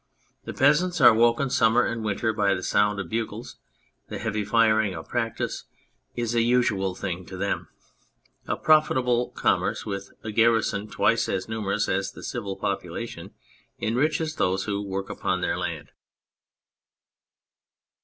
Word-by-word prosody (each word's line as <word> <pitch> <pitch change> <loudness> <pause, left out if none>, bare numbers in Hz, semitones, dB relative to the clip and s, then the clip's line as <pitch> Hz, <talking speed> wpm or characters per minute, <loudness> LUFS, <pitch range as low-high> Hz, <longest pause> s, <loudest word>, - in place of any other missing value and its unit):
The - - -5
peasants 150 +6 +3
are 120 -3 +8
woken 120 +4 +2
summer 115 +1 +4
and 115 -1 -3
winter 110 +1 0
by 100 -2 +2
the 90 - -5
sound 105 +1 +2
of 95 - -4
bugles; 115 +1 -4 0.5
the - - -5
heavy 110 -2 -2
firing 110 -2 +2
of 80 - -8
practice 115 -2 -3 0.5
is 120 -1 -2
a 120 - +3
usual 105 -6 +1
thing 90 -1 -4
to 95 - -8
them; 100 +2 -2 0.8
a - - 0
profitable 125 -6 +3
commerce - - 0
witli 100 -1 -5
a 110 - -4
garrison 110 -2 +2
twice 115 +1 +1
as 95 -1 -2
numerous 105 -1 -1
as 95 +1 -1
the - - -11
civil 100 -5 -4
population 100 0 -5 0.4
enriches 155 +7 0
those 95 +1 +1
who 100 -1 -2
work 95 -1 -4
upon - - -2
their - - 0
land. - - -4
110 Hz, 145 wpm, -25 LUFS, 100-120 Hz, 0.8 s, are